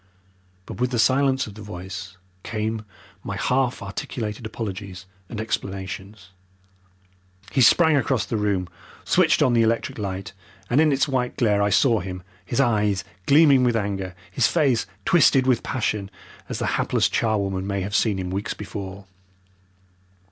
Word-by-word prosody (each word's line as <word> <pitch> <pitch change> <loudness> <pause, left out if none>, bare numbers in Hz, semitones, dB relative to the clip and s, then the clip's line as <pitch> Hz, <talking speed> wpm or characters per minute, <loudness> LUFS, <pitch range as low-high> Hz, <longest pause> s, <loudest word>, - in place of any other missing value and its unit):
But - - -9
with 125 0 +1
the 125 - -2
silence 130 +2 +3
of 105 - -10
the 110 - -11
voice 95 -1 -8 0.2
came 110 0 -3 0.4
my 100 - -4
half 125 +2 0
articulated 105 +3 -5
apologies 95 -4 -6 0.2
and 115 - -6
explanations. 95 -2 -5 1.2
He 130 - +2
sprang 160 +5 +6
across 130 -3 +1
the - - -3
room, 100 -4 0 0.4
switched 165 -4 +3
on 130 -4 +3
the 115 - +4
electric 115 0 0
light, 95 -1 -4 0.4
and 135 +6 +5
in 155 -1 +4
its 140 +2 +2
white 130 -3 -1
glare 105 -4 +2
I 100 - +2
saw 115 +1 +4
him, 90 -1 -6 0.2
his 120 - -3
eyes 105 -6 +2 0.2
gleaming 140 -3 +6
with 120 -2 +2
anger, 95 -4 -2 0.2
his 125 - +3
face 135 - +1 0.2
twisted 140 -6 +5
with 125 -3 +2
passion, 105 -6 -2 0.4
as - - -3
the - - -2 0.2
hapless - - +2
charwoman 100 -4 -1
may 100 -1 -1
have 100 +2 -4
seen 105 -2 +2
him 90 -1 -4
weeks 100 +2 -3
before. 100 -1 -7
110 Hz, 155 wpm, -23 LUFS, 95-125 Hz, 1.2 s, sprang